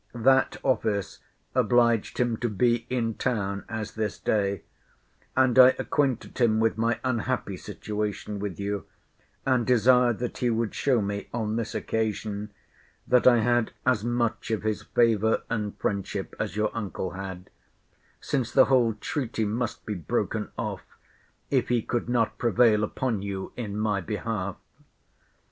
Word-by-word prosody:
That 130 +3 +3
office 110 -6 0 0.3
obliged 120 -2 +2
him 120 -2 +1
to 120 - -1
be 120 +3 +1
in 115 -3 0
town 100 -5 -2
as 110 -1 -4
this 110 -2 -3
day: 100 -3 0 0.7
and 130 -1 +4
I 130 0 +9
acquainted 140 -6 -1
him 110 -3 +3
with 115 -1 +2
my 115 +1 0
unhappy 120 -4 -1
situation 105 +2 -4
with 100 -3 -4
you; 100 0 -3 0.6
and 130 -2 +3
desired 125 0 +4
that 125 0 -4
he 125 - +1
would 115 -2 0
show 125 -6 +2
me, 100 0 -3
on 110 -2 -2
this 115 -1 -3
occasion, 105 -1 -2 0.6
that 125 0 +4
I 120 -2 +6
had 120 0 +1
as 125 -5 +2
much 120 -1 -1
of 110 -2 -1
his 110 -1 -1
favour 110 -2 +2
and 105 -3 -2
friendship 100 -1 -3
as 105 -1 -3
your 105 0 0
uncle 100 -4 -3
had; 95 -1 -7 0.7
since 130 -4 -1
the 130 - +6
whole 120 -5 +3
treaty 120 -6 -2
must 115 +3 -3
be 105 - -2
broken 85 -6 -2
off, - - -3 0.7
if - - +2
he 120 -2 +2
could 120 0 -2
not 120 -2 +1
prevail 115 -2 +4
upon 110 -1 -1
you 100 -1 -5
in 105 -4 -4
my 105 -2 0
behalf. 100 0 -3
110 Hz, 150 wpm, -27 LUFS, 105-120 Hz, 0.7 s, I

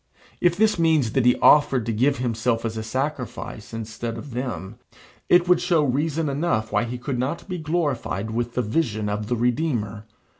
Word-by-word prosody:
If 175 -1 +3
this 215 -3 +3
means 160 -8 +3
that 125 0 +2
he 125 - +5
offered 135 -5 +5
to 115 - -1
give 135 +6 +2
himself 115 -1 -1
as 115 -1 -3
a 110 - -3
sacrifice 125 -2 -4
instead 115 +1 -5
of 140 +4 -8
them, 115 -4 -5 0.5
it 175 0 +5
would 180 -1 +4
show 165 -4 +2
reason 150 +4 0
enough 135 -7 -1
why - - +1
he 120 +1 -5
could 125 0 -3
not 135 +6 -3
be 180 -2 -4
glorified 145 - -2
with 120 +1 -2
the 125 - +1
vision 110 -4 -1
of 105 +1 -3
the 120 - 0
Redeemer. 115 -4 -1
125 Hz, 185 wpm, -24 LUFS, 110-150 Hz, 0.5 s, he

